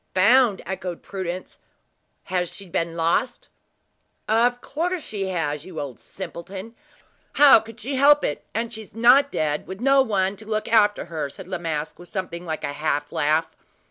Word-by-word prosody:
"Found!" 215 +2 +4
echoed 185 -1 -5
Prudence; 185 -2 -6 0.6
"has 180 -2 -1
she 200 - -11
then 170 -1 -1
been 165 0 -10
lost?" 170 +9 0 0.8
"Of 240 +3 +3
coarse 335 +5 -3
she 200 -3 -4
has, 150 -5 -2
you 175 -2 -8
old 135 -5 -6
simpleton! 190 +4 -8 0.6
How 290 -5 +8
could 225 +1 -12
she 265 +4 -3
help 290 +2 +6
it, 145 - -3
and 230 +2 -3
she 220 -1 -6 0.5
dead, 150 - -1
with 190 +1 -7
no 270 +2 +5
one 200 -5 0
to 215 - -12
look 215 0 -2
after 210 -2 +3
her?" 155 -4 -4
said 180 +5 -11
La 185 -1 -4
Masque, 160 -2 -4
with 175 -1 -12
something 180 -2 -5
like 160 -1 -4
a 145 - -2
half 145 0 -1
laugh. 155 +2 +1
190 Hz, 170 wpm, -23 LUFS, 165-225 Hz, 0.8 s, How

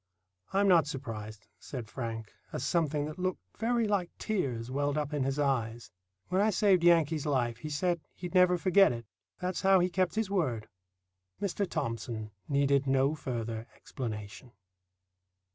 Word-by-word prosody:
"I'm 200 +1 +3
not 170 -6 +5
surprised," 110 -6 -6
said 125 -5 -6
Frank, 115 -2 -5 0.2
as - - -3
something 150 -2 +1
that 155 +4 -7
looked 185 0 -1 0.2
very 230 0 +2
like 195 -4 +1
tears 130 - -2
welled 145 +2 0
up 150 0 -2
in 145 - 0
his 135 +1 0
eyes. 120 -5 -1 0.4
"When 185 +2 +2
I 215 - +4
saved 195 -3 +3
Yankee's 165 -3 +4
life 120 -5 +1
he 155 - -6
said 170 +3 0
he'd 180 -1 -7
never 180 -1 +5
forget 195 +3 +5
it. 115 -1 -5 0.3
That's 180 0 -2
how 190 0 +6
he 180 +1 +1
kept 185 +1 +1
his 220 -3 -1
word." 130 - 0 0.7
Mr. 200 0 -1
Thomson 115 -6 -3 0.2
needed 140 -1 +2
no 135 +2 +3
further 115 -6 -4
explanation. 110 0 -7
145 Hz, 155 wpm, -31 LUFS, 120-180 Hz, 0.7 s, how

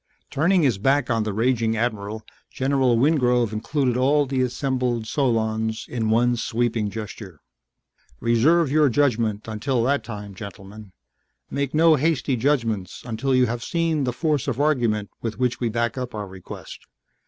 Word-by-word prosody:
Turning 170 +4 +2
his 120 -8 +2
back 135 +3 +2
on 115 -1 +1
the 105 0 -2
raging 115 +1 +1
admiral, 110 -2 -2 0.3
General 130 -3 +1
Wingrove 125 -5 +2
included 125 +3 0
all 140 +3 +3
the 135 -1 -1
assembled 125 -2 -1
solons 110 -4 -1
in 115 -3 -2
one 120 +2 +3
sweeping 115 -2 -1
gesture. 100 -5 -8 0.8
"Reserve 140 +7 +3
your 150 -1 +4
judgment 115 -6 0
until 115 +3 -1
that 140 +3 +1
time, 105 -3 -7
gentlemen, 100 +1 -10 0.6
make 140 0 -2
no 160 0 +5
hasty 145 -2 +1
judgments 115 -7 -1
until 125 +3 -1
you 125 0 +4
have 120 0 -3
seen 165 -3 0
the 125 - 0
force 150 +1 -1
of 135 -2 -2
argument 120 -9 +1
with 115 -2 -4
which 125 -1 0
we 120 - 0
back 120 +3 -1
up 125 -2 -5
our 105 -1 -4
request. 95 -1 -10
120 Hz, 155 wpm, -23 LUFS, 110-135 Hz, 0.8 s, no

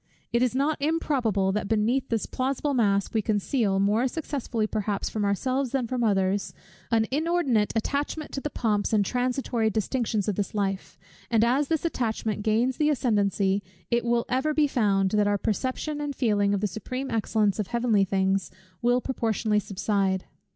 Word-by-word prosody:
It 235 - +3
is 255 0 +1
not 285 +2 0
improbable, 255 - +1
that 210 0 -2
beneath 230 +5 +1
this 225 -2 0
plausible 275 +2 -1
mask 200 -5 +1
we 220 - +2
conceal, 205 -1 0
more 210 +6 +2
successfully 260 -6 -2
perhaps 210 -1 -2
from 215 - -2
ourselves 255 +6 0
than 265 -3 +1
from 245 +1 -2
others, 195 -2 +1 0.3
an 225 -1 +3
inordinate 290 -8 +1
attachment 285 +6 -2
to 275 - -4
the 295 - -3
pomps 215 -5 0
and 205 -2 +3
transitory 245 -1 0
distinctions 220 -1 -1
of 205 - -1
this 205 0 -2
life; 195 -2 -2 0.3
and 225 -2 +3
as 265 +5 +2
this 320 0 -1
attachment 225 -8 -1
gains 230 +4 +1
the 300 0 +2
ascendency, 205 -7 +1 0.3
it 235 0 +2
will 235 0 +1
ever 270 +4 0
be 305 - +4
found, 200 -8 +1
that 210 -1 +2
our 205 0 +2
perception 260 +8 -2
and 290 -1 -3
feeling 205 -5 +2
of 195 - -2
the - - +1
supreme 255 +7 -5
excellence 215 -2 +1
of 210 - -1
heavenly 235 -3 +2
things 190 -1 0 0.3
will 245 +1 +3
proportionably 225 -4 0
subside. 195 -1 -1
225 Hz, 170 wpm, -26 LUFS, 205-260 Hz, 0.3 s, be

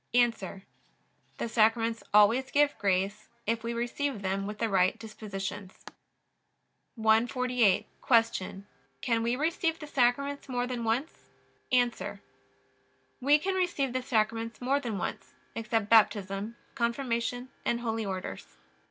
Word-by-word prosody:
A. 245 -1 +7 1.1
The - - -2
Sacraments 225 0 +2
always 220 +6 +5
give 290 0 +3
grace, 200 +2 0 0.2
if 225 +1 -1
we 230 - -2
receive 240 0 -2
them 195 +1 -1
with 210 0 -5
the 230 - 0
right 190 0 +2
dispositions. 205 -3 -7 1.1
148. 230 -1 +3 0.5
Q. 190 +1 -6 0.4
Can 230 -3 +1
we 235 +2 +1
receive 325 +3 0
the 315 - -8
Sacraments 280 +1 0
more 245 -1 0
than 250 -2 -4
once? 235 +8 -2 0.4
A. 245 -1 +1 1.0
We 285 +3 +5
can 380 +6 -2
receive 345 -9 0
the 255 - 0
Sacraments 230 -2 -1
more 265 +3 +1
than 235 -7 -3
once, - - -5 0.2
except 225 -2 -1
Baptism, 205 -1 +3 0.2
Confirmation, 245 0 -1
and 235 0 0
Holy 225 -1 -1
Orders. 185 - -5
230 Hz, 125 wpm, -29 LUFS, 215-255 Hz, 1.1 s, A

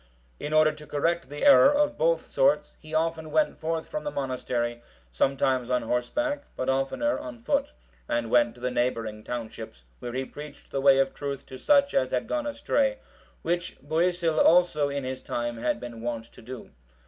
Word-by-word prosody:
In 150 - -4
order 155 0 +5
to 150 0 -12
correct 165 0 0
the 145 +1 -3
error 280 0 +8
of 290 0 +2
both - - +1
sorts, - - +2
he 155 - -13
often 160 0 -1
went 305 - +2
forth 160 0 -3
from 305 0 -4
the 295 - -2
monastery, 125 - -2 0.3
sometimes 130 - +1
on 125 -1 +1
horseback, 285 - -1
but 130 - -2
oftener 135 - 0
on 125 -1 -8
foot, 115 - 0 0.4
and 120 -1 -1
went 120 -1 +4
to 120 - -16
the 125 0 -1
neighbouring 115 -3 -1
townships, 110 - -7
where 120 - -6
he 130 +1 -2
preached 150 +1 -11
the 135 - -1
way 135 -1 +6
of 135 0 +2
truth 140 -2 -5
to 130 - -9
such 280 -1 +4
as 130 - +2
had 125 -1 -1
gone 300 -1 -1
astray; 280 -1 0 0.5
which 175 +1 -2
Boisil 165 +2 +1
also 165 -4 +4
in 140 -1 -3
his 130 0 -4
time 120 0 -3
had 120 +2 -1
been 120 -2 -8
wont 115 -1 -3
to - - -14
do. 125 +1 -9
140 Hz, 185 wpm, -27 LUFS, 125-175 Hz, 0.5 s, error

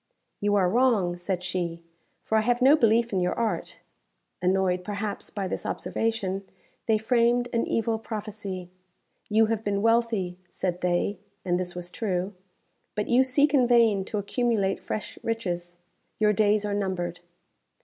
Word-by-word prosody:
"You 205 0 +1
are 190 -3 +4
wrong," 215 -5 +2
said 180 0 -3
she, 175 -2 -3 0.4
"for 220 - -1
I 220 - +5
have 240 +2 +1
no 270 +4 +7
belief 230 -4 +3
in 190 - +2
your 180 0 0
art." 230 -2 -2 0.6
Annoyed, 185 0 +1
perhaps, 205 +1 -4
by 200 -2 -3
this - - -3
observation, 200 -4 -2 0.4
they 220 -1 +4
framed 240 +2 +2
an 230 - +1
evil 225 0 0
prophecy. 205 -5 -6 0.6
"You 220 +1 +5
have 220 0 -1
been 200 -1 -1
wealthy," 225 -6 +1
said 180 -1 -3
they 180 +2 0 0.3
(and 180 -1 +1
this 180 -1 -4
was 175 0 -5
true), 190 -2 -2 0.6
"but 210 0 -2
you 245 +2 +5
seek 280 +3 +3
in 255 -4 +5
vain 230 -5 +4
to 215 - -3
accumulate 205 -1 0
fresh 215 - -5
riches. 175 -6 -3 0.4
Your 210 -1 +3
days 210 0 +3
are 205 - -1
numbered." 180 -3 -2
205 Hz, 155 wpm, -26 LUFS, 185-230 Hz, 0.6 s, no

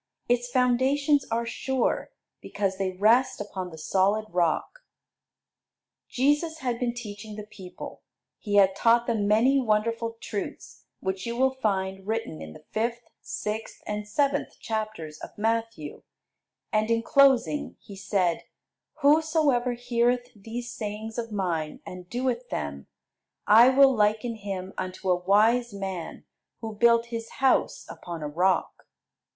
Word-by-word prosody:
Its 245 0 +1
foundations 265 +3 +2
are 230 +1 0
sure, 260 +2 -1 0.3
because 195 -2 -2
they 190 -1 0
rest 240 +7 +3
upon 190 -3 -5
the 160 - -11
solid 195 +6 +1
rock. 175 - 0 1.3
Jesus 295 +5 +1
had 245 -6 -2
been 240 -1 -1
teaching 215 -2 -8
the 210 -1 -7
people. 190 -3 -10 0.4
He 205 -2 -2
had 195 -1 +5
taught 235 +3 +4
them 220 -4 0
many 240 +7 +4
wonderful 230 0 0
truths, 205 -3 -6 0.2
which 190 +2 -3
you 235 - -3
will 265 +2 +2
find 195 -5 -2
written 220 - -3
in 80 0 -8
the - - -14
fifth, 235 +2 -1 0.2
sixth, 215 +1 -5
and 210 0 -4
seventh 280 +6 0
chapters 215 -9 -4
of - - -10
Matthew; 225 -7 -2 0.7
and 215 +1 +2
in 230 0 +2
closing 255 - +3
He 200 - -12
said, 190 -3 0 0.6
"Whosoever 295 -4 +3
heareth 245 0 0
these 230 +4 -6
sayings 220 +1 -5
of 230 -1 -5
mine, 170 -6 -2
and 180 -1 -9
doeth 245 0 -2
them, 70 -1 -4 0.6
I 230 +4 +8
will 270 0 +6
liken 215 +2 +1
him 195 -2 -5
unto 185 0 -2
a - - +5
wise 220 +4 +3
man 190 -4 -5 0.3
who 220 -1 -5
built 235 +2 +4
his 230 0 -5
house 265 -1 +2
upon 170 -3 -7
a - - -2
rock. 175 +4 0
220 Hz, 135 wpm, -26 LUFS, 195-245 Hz, 1.3 s, I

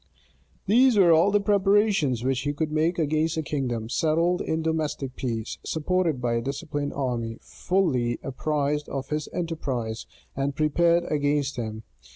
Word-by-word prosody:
These 240 +3 +5
were 180 -4 +6
all 165 +5 +5
the 205 0 +3
preparations 200 - +2
which 130 0 +1
he 145 +2 -2
could 155 +1 -2
make 160 +3 +1
against 155 +1 0
a 160 - -1
kingdom, 125 -6 -2
settled 165 +7 +1
in 160 0 -2
domestic 155 -5 -2
peace, 115 -3 -4
supported 165 -2 0
by 120 -1 0
a 115 - 0
disciplined 145 +2 -3
army, 120 -4 -2
fully 130 -11 0
apprised 145 +2 -1
of 135 -1 -4
his 150 0 -2
enterprise, 130 -10 -3 0.3
and 140 +1 -1
prepared 170 +3 +3
against 145 -2 0
him. 110 -2 -5
150 Hz, 150 wpm, -25 LUFS, 130-170 Hz, 0.3 s, were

